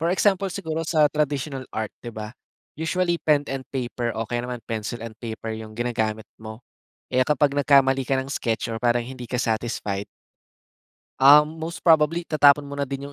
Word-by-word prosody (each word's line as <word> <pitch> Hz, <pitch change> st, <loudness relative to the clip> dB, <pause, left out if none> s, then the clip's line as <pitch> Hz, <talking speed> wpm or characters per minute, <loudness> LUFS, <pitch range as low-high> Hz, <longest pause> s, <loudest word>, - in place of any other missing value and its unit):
For 165 Hz, -, +1 dB
example 195 Hz, 0 st, +2 dB
siguro 165 Hz, -4 st, -3 dB
sa 155 Hz, -2 st, +4 dB
traditional 145 Hz, -2 st, -2 dB
art 110 Hz, -1 st, -3 dB
'di 120 Hz, -, -6 dB
ba? 110 Hz, +1 st, -6 dB, 0.4 s
Usually 175 Hz, +2 st, 0 dB
pen 145 Hz, -2 st, +2 dB
and 135 Hz, -1 st, -4 dB
paper 120 Hz, -2 st, -2 dB
o 115 Hz, -, -1 dB
kaya 120 Hz, 0 st, -2 dB
naman 125 Hz, -1 st, -5 dB
pencil 115 Hz, +1 st, -4 dB
and 115 Hz, -1 st, -8 dB
paper 110 Hz, -1 st, -5 dB
yung 110 Hz, -1 st, -9 dB
ginagamit 110 Hz, -3 st, -1 dB
mo, 110 Hz, +1 st, -9 dB, 0.5 s
eh, 130 Hz, -, +4 dB
kapag 145 Hz, 0 st, +2 dB
nagkamali 135 Hz, -1 st, +4 dB
ka 135 Hz, +1 st, 0 dB
ng 135 Hz, -, -7 dB
sketch 115 Hz, -3 st, -2 dB
or 115 Hz, -, -3 dB
parang 120 Hz, 0 st, +2 dB
hindi 130 Hz, -1 st, -8 dB
ka 125 Hz, -, -1 dB
satisfied. 110 Hz, -4 st, -2 dB, 1.2 s
Um, 150 Hz, +3 st, +6 dB
most 165 Hz, +1 st, -6 dB
probably 165 Hz, +1 st, +4 dB
itatapon 145 Hz, -2 st, +5 dB
mo 140 Hz, -, -10 dB
na 140 Hz, -, -1 dB
din 140 Hz, +1 st, -6 dB
135 Hz, 180 wpm, -24 LUFS, 115-150 Hz, 1.2 s, Um